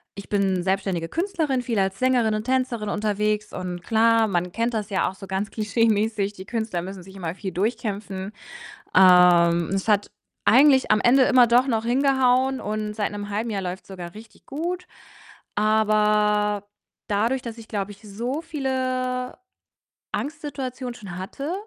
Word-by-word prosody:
Ich 200 - -9
bin 195 -3 +1
selbstständige 190 -3 -1
Künstlerin, 320 -7 -1
viel 230 -3 -1
als 195 0 0
Sängerin 250 -4 +2
und 215 - -3
Tänzerin 255 -4 -1
unterwegs 210 0 -1
und 180 -1 -5
klar, 225 0 +3
man 180 -2 -1
kennt 230 +4 -1
das 215 -1 -3
ja 190 -2 +1
auch - - -9
so 195 - -10
ganz 195 +2 -3
klischeemäßig: 215 -1 +1
„Die 190 -2 -10
Künstler 220 -5 -3
müssen 190 +1 -7
sich 190 +2 -14
immer 170 -4 -4
viel 190 -1 -5
durchkämpfen.“ 205 -1 -3 0.6
Ähm, 175 -2 +6
es 195 +1 -2
hat 205 -2 +2 0.3
eigentlich 265 +1 +5
am 215 - +4
Ende 260 +2 +5
immer 255 -2 +5
doch 240 +2 +4
noch 225 -3 0
hingehauen 260 0 +2
und 210 0 -3
seit 210 0 -1
'nem 205 0 -6
1/2 215 +3 -2
Jahr 200 -2 -2
läuft's 180 +1 -6
sogar 175 -3 -8
richtig 220 +1 -14
gut. 350 +5 -4 0.7
Aber 210 -1 +2 0.4
dadurch, 225 +6 0
dass 235 -2 -7
ich, 225 - -12
glaube 205 -2 -3
ich, 200 0 -14
so 235 +8 -4
viele 255 -4 -2 0.8
Angstsituationen 275 -4 -4
schon 190 -6 -8
hatte, 275 - -5
215 Hz, 160 wpm, -24 LUFS, 195-250 Hz, 0.8 s, Ähm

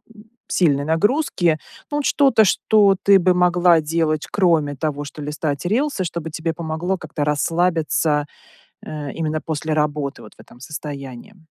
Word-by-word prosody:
м, 210 0 -15 0.2
сильной 145 -5 +1
нагрузки. 175 - +1 0.3
Ну 290 - -1
вот, 295 - -2
что-то, 270 -6 +4
что 200 0 +3
ты 200 -1 +6
бы 185 0 +3
могла 175 -2 +4
делать, 155 0 -1
кроме 165 -7 +2
того, 145 +1 -3
что 145 +1 -9
листать 150 +1 -3
рилсы? 240 +3 0
Что 170 -1 -4
бы 160 - -6
тебе 165 +1 -3
помогло 170 +3 -3
как-то 155 -3 -5
расслабиться, 155 0 +1 0.6
э, 145 -3 -6
именно 155 -1 -2
после 155 0 -3
работы, 150 -2 -1
вот, - - -14
в - - -37
этом 120 - -16
состоянии? 140 - -8
160 Hz, 155 wpm, -21 LUFS, 150-180 Hz, 0.6 s, ты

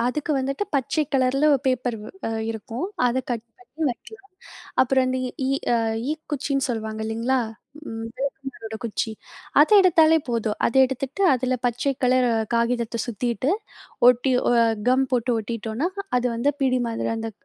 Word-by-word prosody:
அதுக்கு 300 +4 -1
வந்துட்டு, 275 +8 -1
பச்சை 280 +3 +1
கலர்ல 270 +1 +2
ஒரு 270 - 0
பேப்பர் 250 -2 0
வ் 215 - -9 0.2
அ - - -3 0.2
இருக்கும். 225 +5 -5 0.2
அத 245 +1 0
கட் 235 -2 -2
பண்ணி 370 -4 -18
வைக்கலாம். 395 - -9 0.5
அப்பறம் 260 0 +3
இந்த 255 0 -1
ஈ - - -4 0.2
ஈ - - +1 0.2
அ - - +4 0.4
ஈக்குச்சின்னு 290 -3 -2
சொல்லுவாங்க 220 -2 -3
இல்லேங்களா? 230 +4 0 0.8
விளக்கமாரோட 270 -4 -5
குச்சி. 225 0 -2 0.5
அத 300 - +6
எடுத்தாலே 325 -3 +5
போதும். 225 -3 -1
அத - - -2
எடுத்துட்டு 265 +7 -4
அதில 255 0 0
பச்சை 245 +3 0
கலர் 250 0 +3 0.3
காகிதத்த 235 0 0
சுத்திட்டு, 240 +4 -1 0.6
ஒட்டி 250 +2 +3 0.2
ஒ - - +4 0.4
கம் 260 +1 +3
போட்டு 245 0 +1
ஒட்டிட்டோன்னா, 225 +6 -3 0.3
அது 250 - -1
வந்து 240 +5 +1
பிடி 255 -1 +2
மாதிரி 225 0 -2
அந்த 225 0 -4
255 Hz, 150 wpm, -24 LUFS, 230-275 Hz, 0.8 s, அத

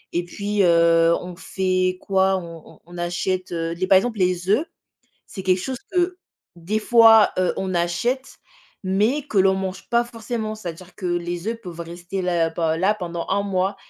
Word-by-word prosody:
et 175 - +1
puis, 205 +3 -2
heu, 170 -1 +4
on 180 0 -8
fait 185 0 -1
quoi? 190 0 +2
On 170 -3 -10
on - - -24
on 175 +1 -12
achète, 180 +2 -2
heu, 165 -1 -2
les 185 +2 -2
par 190 0 +7
exemple 220 +2 -1
les 180 -1 0
œufs, 220 +11 +3 0.6
c'est 190 - -8
quelque 185 0 +2
chose 260 +5 -4
que 360 0 0 0.4
des 180 +6 -2
fois, 225 -1 +6
heu, 185 -1 +2
on 190 -1 -3
achète 235 +10 -1 0.5
mais 210 +10 +1
que 220 - 0
l'on 190 0 +4
mange 190 0 -5
pas 235 0 +3
forcément, 230 -2 -5
c'est-à-dire 180 -3 -9
que 185 - -6
les 175 +2 -2
œufs 230 0 -3
peuvent 175 -5 -9
rester 175 +3 -5
là 170 -2 +1
pe 160 -1 -1
là 190 +5 +2
pendant 170 -4 -5
un 200 +1 +1
mois 195 0 -1
185 Hz, 185 wpm, -22 LUFS, 175-210 Hz, 0.6 s, par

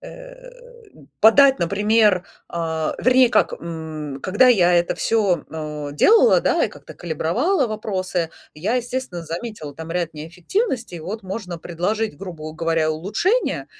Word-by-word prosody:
Э, - - -12 0.7
подать, 270 +5 +6
например, 205 +1 +2 0.2
а, 160 -2 -2
вернее 255 -1 +5
как. - - +2
М, 155 -4 -7
когда 205 +7 +3
я 185 -8 +5
это 175 0 +2
всё, 205 -6 +1
э, 150 -2 -5
делала, 440 - +5
да, - - +1
и - - -1
как-то - - -13
калибровала 230 - 0
вопросы, 185 -6 -3 0.2
я, 185 +11 -2
естественно, 245 -8 -4
заметила 165 -3 -6
там 160 +1 -8
ряд 170 -2 -2
неэффективностей. 180 - -3
Вот 195 +6 -6
можно 185 -3 -6
предложить, 180 +3 -2
грубу 160 -4 -8
говоря, 165 -1 0
улучшения 215 - -1
180 Hz, 130 wpm, -21 LUFS, 165-230 Hz, 0.7 s, подать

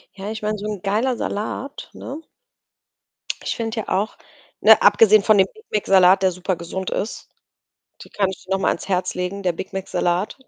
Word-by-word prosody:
Ja, 200 +1 -6
ich 220 - -6
meine, 215 0 -1
so 205 - -7
'n 205 -4 -5
geiler 225 +6 0
Salat, 230 +7 -5
ne? 290 +5 -8 1.2
Ich - - -2
finde 230 0 -4
ja - - -9
auch 200 +4 -1 0.4
ne, 220 0 +7
abgesehen 210 0 +6
von 215 -2 +4
dem 190 - +5
Big 435 +1 -19
Mac-Salat, 190 -2 +5
der 185 - +4
super 185 +1 -2
gesund 180 +2 -5
ist. 215 - -4 0.7
Die - - -17
kann 195 -2 0
ich 190 0 -9
dir 190 - -12
noch 195 - +1
mal - - +2
ans - - -3
Herz 185 -1 0
legen, 180 +2 -4
der 180 - +2
Big 185 +3 -8
Mac-Salat. 185 +1 -1
200 Hz, 195 wpm, -21 LUFS, 185-215 Hz, 1.2 s, ne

